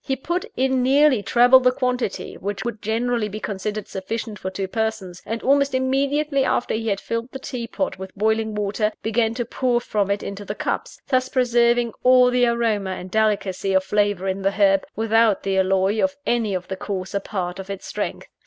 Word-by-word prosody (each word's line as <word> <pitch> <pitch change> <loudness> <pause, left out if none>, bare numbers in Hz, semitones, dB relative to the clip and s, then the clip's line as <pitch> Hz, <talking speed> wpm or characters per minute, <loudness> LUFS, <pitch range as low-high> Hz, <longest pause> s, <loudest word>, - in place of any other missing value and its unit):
He 265 - -1
put 345 +7 -3
in 260 0 +2
nearly 270 -1 +4
treble 245 +4 +6
the 250 -1 +3
quantity 250 -4 -2
which 205 +2 -5
would 235 -3 -4
generally 225 0 -1
be 210 +2 -6
considered 210 0 -4
sufficient 210 +2 -5
for 190 - -4
two 190 0 -4
persons; 220 -4 -3
and 225 +2 -3
almost 280 0 +3
immediately 275 +2 +1
after 250 - 0
he 225 +1 -2
had 200 -2 0
filled 230 +4 -4
the - - -6
tea 250 -3 -5
pot 280 -5 -3
with 190 0 -7
boiling 220 +1 0
water, 210 +1 -1
began 225 +1 +1
to 240 -1 -2
pour 245 0 0
from 205 -4 -1
it 200 0 -1
into 200 +1 -6
the 205 +1 -5
cups - - -3
thus 255 -2 +1
preserving 240 -2 +2
all 250 0 +6
the 245 0 +3
aroma 220 -5 0
and 185 0 -8
delicacy 200 -3 0
of 190 0 +3
flavour 205 -1 0
in 190 +1 -2
the 195 +1 +1
herb, 195 -1 +3
without 225 -1 +2
the 195 -1 +1
alloy 190 +2 +2
of 285 0 +1
any 225 -5 0
of 180 0 -4
the 190 - -4
coarser 190 0 -3
part 185 -3 -4
of 190 0 -8
its 195 -1 -6
strength. - - -4
220 Hz, 200 wpm, -22 LUFS, 195-250 Hz, -, treble